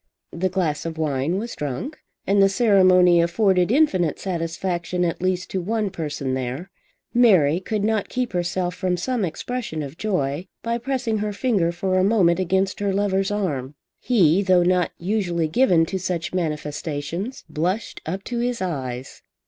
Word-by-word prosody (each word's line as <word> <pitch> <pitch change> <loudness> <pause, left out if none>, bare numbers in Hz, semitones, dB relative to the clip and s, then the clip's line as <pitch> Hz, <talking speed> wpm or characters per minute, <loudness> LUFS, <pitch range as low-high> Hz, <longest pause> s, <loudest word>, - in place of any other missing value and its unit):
The 185 +2 -1
glass 175 -5 -1
of 160 -1 -6
wine 150 +2 0
was 230 +4 -4
drunk 150 - -4 0.3
and 200 0 +3
the 195 - +6
ceremony 185 -5 +5
afforded 180 +2 +2
infinite 195 - +2
satisfaction 175 0 -2
at 170 - -2
least 185 0 -1
to 190 - -1
one 210 +1 -1
person 145 -5 -3
there. 130 +8 -4 0.4
Mary 185 -10 +5
could 210 +2 -2
not 220 -1 0
keep 250 -4 -2
herself 175 0 -1
from 180 -1 -1
some 240 +5 -1
expression 180 -1 -3
of 140 +4 -9
joy 170 -5 -1 0.2
by 235 0 -1
pressing 240 -3 -1
her 210 0 -2
finger 200 -7 +1
for 185 +2 0
a - - +3
moment 190 -4 +3
against 190 +1 0
her 200 -1 0
lover's 195 -1 +1
arm. 150 -10 -2 0.2
He, 190 -7 +3
though 185 -2 +4
not 180 0 +2
usually 175 -4 -1
given 175 -3 +3
to 190 +3 -3
such 175 -1 -3
manifestations, 155 - -3
blushed 180 +8 -2
up 190 +5 -4
to 240 -1 -3
his 245 0 -1
eyes. 130 -8 -4
185 Hz, 160 wpm, -23 LUFS, 165-205 Hz, 0.4 s, the